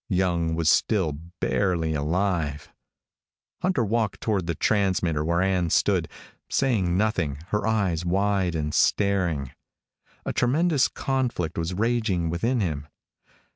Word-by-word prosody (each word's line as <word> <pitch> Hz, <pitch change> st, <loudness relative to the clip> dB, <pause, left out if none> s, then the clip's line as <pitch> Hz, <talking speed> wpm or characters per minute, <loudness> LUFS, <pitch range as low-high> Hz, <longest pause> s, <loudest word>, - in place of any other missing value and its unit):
Young 85 Hz, -4 st, +1 dB
was 80 Hz, -1 st, -1 dB
still 90 Hz, +1 st, +3 dB, 0.3 s
barely 85 Hz, -5 st, 0 dB
alive. 80 Hz, -1 st, -1 dB, 0.9 s
Hunter 180 Hz, -10 st, +1 dB
walked 110 Hz, -1 st, -1 dB
toward 100 Hz, -6 st, -1 dB
the 85 Hz, -, -1 dB
transmitter, 95 Hz, -7 st, +1 dB
where 85 Hz, +3 st, +1 dB
Ann 90 Hz, -3 st, +1 dB
stood, -, -, +2 dB, 0.4 s
saying 100 Hz, -10 st, +1 dB
nothing, 95 Hz, -9 st, 0 dB
her 105 Hz, +1 st, 0 dB
eyes 95 Hz, -7 st, 0 dB
wide 95 Hz, 0 st, +1 dB
and 75 Hz, -1 st, -2 dB
staring. 90 Hz, -9 st, +1 dB, 0.7 s
A -, -, -2 dB
tremendous 145 Hz, +2 st, +2 dB
conflict 130 Hz, -11 st, -2 dB
was 85 Hz, +2 st, -2 dB
raging 105 Hz, -6 st, 0 dB
within 115 Hz, +8 st, 0 dB
him. 75 Hz, -6 st, -3 dB
95 Hz, 120 wpm, -25 LUFS, 85-110 Hz, 0.9 s, still